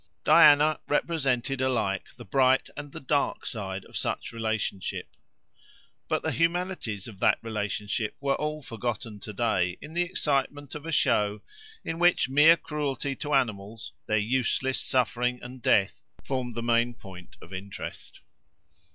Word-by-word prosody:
Diana 150 +1 +7
represents 140 -5 0
alike 125 -8 0
the 120 - -10
bright 130 +4 +3
and 145 0 -7
the - - -7
dark 140 +2 0
side 100 -5 -4
of - - -15
such - - -2
relationship. 110 -4 -3 0.9
But - - 0
the - - 0
humanities 170 - -1
of 105 -5 -11
that - - +4
relationship 105 0 -2
were 140 -1 +1
all 150 0 -3
forgotten 115 -2 -4
to 105 - -8
day 95 -5 0
in 155 - -10
the 175 - +1
excitement 145 -5 -1
of 150 +1 -7
a - - -3
show, 105 -7 +2 0.4
in 165 - -3
which 175 -4 +4
mere 150 +5 +6
cruelty 145 -3 -3
to 145 -1 -1
animals, 110 -4 -2
their 110 - +2
useless 130 +4 +1
suffering 125 0 +1
and 125 +1 -9
death, 100 -3 +2 0.2
formed 125 -3 -3
the 115 - -3
main 120 0 +2
point 95 -5 -12
of 90 - -13
interest. 95 +1 -8
125 Hz, 145 wpm, -27 LUFS, 105-145 Hz, 0.9 s, Diana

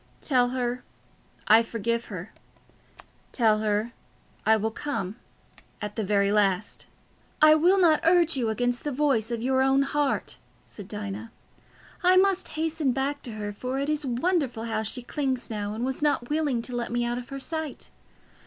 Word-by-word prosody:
Tell 250 -4 +2
her, 250 -1 -2 0.6
I 220 +2 +7
forgive 230 0 -2
her; 185 -1 -8 1.0
tell 220 -4 +3
her 215 +2 0 0.6
I 220 - +6
will 220 +1 -1
come—at 210 -3 -7
the 220 - -1
very 200 0 +2
last." 200 -2 0 0.5
"I 310 0 +8
will 350 +5 +4
not 325 -4 +5
urge 335 -1 +4
you 240 -4 0
against 245 +2 -1
the 295 - -2
voice 265 -5 +1
of 235 -1 -3
your 260 +1 +2
own 270 +1 +4
heart," 285 0 -1 0.3
said 205 -3 -11
Dinah. 210 +1 -6 0.7
"I 365 0 +5
must 385 0 +3
hasten 315 -4 0
back 275 +2 -2
to 235 - -8
her, 205 -1 -5
for 255 +5 -4
it 280 +2 -1
is 305 -1 0
wonderful 260 -2 0
how 220 -1 -2
she 235 +3 -4
clings 260 -2 -2
now, 205 -1 -3
and 235 +3 -2
was 265 +1 -3
not 290 -4 0
willing 295 -6 0
to 250 - -4
let 240 -1 -3
me 240 0 0
out 240 +1 -2
of 245 - -10
her 275 - -5
sight. 315 0 -5
245 Hz, 170 wpm, -26 LUFS, 220-290 Hz, 1.0 s, I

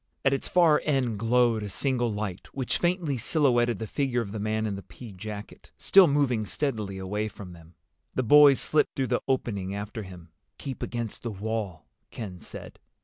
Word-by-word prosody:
At 135 - +4
its 135 - -1
far 165 -4 +4
end 130 -8 0
glowed 115 0 +3
a 105 - -5
single 120 +2 0
light, 105 -3 -4
which 130 -3 -1
faintly 175 -6 0
silhouetted 120 -3 +2
the 110 - -4
figure 125 +1 -1
of 100 -4 -6
the 110 - -5
man 110 +1 -1
in 105 -2 -2
the 100 - -7
pea 115 +2 -12
jacket, 105 +2 -9
still 195 -2 +6
moving 140 -6 +1
steadily 105 -5 -3
away 105 +3 -2
from 100 -4 -10
them. 85 0 -16 0.4
The 130 - +1
boys 145 +2 +7
slipped 155 - +1
through 130 -3 -1
the - - +1
opening 100 -7 -1
after 105 +2 -5
him. 90 -4 -11 0.3
"Keep 135 -3 -6
against 120 -2 -4
the 120 - -4
wall," 105 -6 -4 0.2
Ken 95 -6 -7
said. - - -9
115 Hz, 185 wpm, -27 LUFS, 100-135 Hz, 0.4 s, boys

